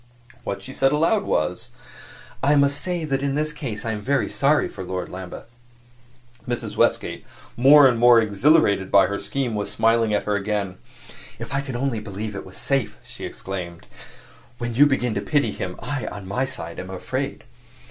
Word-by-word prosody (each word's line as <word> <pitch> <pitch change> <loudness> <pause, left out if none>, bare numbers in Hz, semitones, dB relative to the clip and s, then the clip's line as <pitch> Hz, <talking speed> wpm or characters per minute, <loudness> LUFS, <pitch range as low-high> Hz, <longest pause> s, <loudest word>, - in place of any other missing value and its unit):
What - - -4
she 130 - -8
said 135 0 +2
aloud 170 +8 +2
was, 75 +4 -1 0.7
"I 145 +2 +4
must 140 0 +2
say 175 -3 -2
that 135 -2 -1
in 140 0 -1
that 150 0 -1
case 115 -8 -5
I 115 - -1
am 105 -1 -4
very 130 -2 0
sorry 145 +2 +2
for - - -8
Lord 90 0 -4
Lambeth." 90 -1 -8 1.0
Mrs. 120 -1 -3
Westgate, - - +1 0.3
more 140 +4 +7
and 125 -3 +4
more 120 0 +7
exhilarated 105 - +3
by 100 -1 +6
her 100 - -3
scheme, 125 +3 -2
was 105 -1 -2
smiling 115 -1 +2
at 105 - +1
her 105 - 0
again. 100 -2 -2 0.6
"If - - -7
I 135 - +1
could 135 -3 -6
only 125 -2 -1
believe 105 0 -6
it 100 - -7
was 95 - -11
safe!" 135 -4 -1
she - - -9
exclaimed. 90 -3 -6 0.7
"When 120 0 -3
you 145 +5 +6
begin 125 -4 0
to - - -2
pity 145 -2 +1
him, - - -5
I, 145 -3 -3
on 100 -2 -7
my 125 +7 0
side, 85 -11 -7
am 95 - -7
afraid." 95 -1 -4
120 Hz, 185 wpm, -23 LUFS, 100-140 Hz, 1.0 s, more